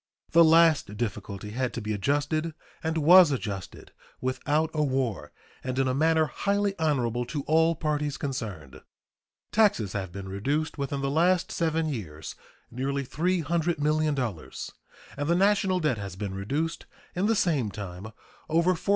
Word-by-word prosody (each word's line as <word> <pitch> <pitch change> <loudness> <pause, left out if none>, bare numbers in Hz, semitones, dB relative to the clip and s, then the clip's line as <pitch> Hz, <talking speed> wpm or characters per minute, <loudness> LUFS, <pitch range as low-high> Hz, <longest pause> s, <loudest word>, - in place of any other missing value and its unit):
The 170 0 +7
last 160 -9 +4
difficulty 105 -2 -4
had 125 +2 -2
to - - -2
be 110 0 -2
adjusted, 145 +8 -1 0.3
and 160 0 -1
was 175 +2 +8
adjusted 100 -8 -5 0.3
without 150 +4 0
a 155 - 0
war 130 -7 -1 0.3
and 130 0 -3
in 135 0 +2
a 130 - +1
manner 160 +3 +3
highly 200 +5 0
honorable 125 -7 +1
to 145 +3 -4
all 160 +2 +3
parties 150 -2 -1
concerned. 100 - -5 0.7
Taxes 195 - +2
have 95 -3 -4
been 95 +1 -7
reduced 140 +12 -2
within 140 0 -2
the 135 0 -1
last 175 +4 +2
seven 160 -1 0
years 85 - -5 0.4
nearly 135 +3 -2
$300,000,000, 155 - -1 0.5
and 145 0 -2
the 170 - +4
national 195 -1 +3
debt 150 -9 0
has 100 -2 -6
been 95 0 -4
reduced 140 +13 -3 0.3
in 185 +3 0
the 225 - +3
same 150 - +1
time 95 -1 -7 0.4
over 170 +3 +3
$435,000,000. 175 - -9
145 Hz, 150 wpm, -27 LUFS, 115-165 Hz, 0.7 s, was